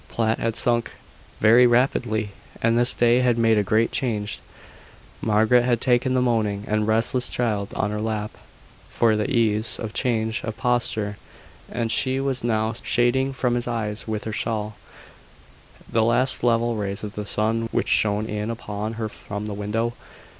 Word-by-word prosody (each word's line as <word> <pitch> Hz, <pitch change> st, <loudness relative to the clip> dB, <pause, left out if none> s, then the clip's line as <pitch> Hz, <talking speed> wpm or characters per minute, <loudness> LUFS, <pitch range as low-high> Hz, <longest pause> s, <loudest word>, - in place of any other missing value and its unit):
Platt 110 Hz, -1 st, 0 dB
had 115 Hz, -1 st, -1 dB
sunk 120 Hz, -1 st, 0 dB, 0.5 s
very 120 Hz, +3 st, +6 dB
rapidly, 120 Hz, -3 st, +1 dB, 0.3 s
and 115 Hz, 0 st, +2 dB
this 120 Hz, +1 st, +4 dB
day 120 Hz, +1 st, +4 dB
had 125 Hz, -2 st, +2 dB
made 115 Hz, -2 st, +3 dB
a -, -, +1 dB
great 110 Hz, +4 st, +1 dB
change. 105 Hz, -, -2 dB, 0.8 s
Margaret 110 Hz, +3 st, +3 dB
had 120 Hz, -1 st, +1 dB
taken 125 Hz, +1 st, +2 dB
the 125 Hz, -, +2 dB
moaning 105 Hz, -4 st, 0 dB
and 105 Hz, 0 st, 0 dB
restless 115 Hz, +3 st, +2 dB
child 105 Hz, -5 st, -1 dB
on 105 Hz, -, -1 dB
her 105 Hz, -, -3 dB
lap, 110 Hz, -1 st, -3 dB, 0.6 s
for 115 Hz, -2 st, +2 dB
the 105 Hz, +4 st, -1 dB
ease 110 Hz, -4 st, +1 dB
of 110 Hz, -1 st, -6 dB
change 110 Hz, -3 st, -1 dB
of 110 Hz, -1 st, -5 dB
posture: 115 Hz, -4 st, -1 dB, 0.5 s
and 115 Hz, -2 st, -2 dB
she 130 Hz, 0 st, +2 dB
was 135 Hz, -3 st, -2 dB
now 110 Hz, -1 st, 0 dB
shading 130 Hz, +3 st, +1 dB
from 125 Hz, -2 st, 0 dB
his 120 Hz, 0 st, -1 dB
eyes 110 Hz, -3 st, -3 dB
with 110 Hz, -1 st, -3 dB
her 110 Hz, -, -5 dB
shawl, 110 Hz, -1 st, -2 dB, 1.1 s
the 115 Hz, -, +1 dB
last 125 Hz, +3 st, +1 dB
level 120 Hz, -1 st, +2 dB
rays 100 Hz, 0 st, -4 dB
of 105 Hz, -1 st, -6 dB
the 105 Hz, -, -5 dB
sun 115 Hz, +2 st, 0 dB
which -, -, -1 dB
shone 105 Hz, 0 st, +2 dB
in 105 Hz, 0 st, -4 dB
upon 110 Hz, -1 st, -5 dB
her 110 Hz, -1 st, -3 dB
from 105 Hz, 0 st, -7 dB
the 105 Hz, -, -4 dB
window. 110 Hz, +3 st, -2 dB
115 Hz, 170 wpm, -23 LUFS, 105-120 Hz, 1.1 s, very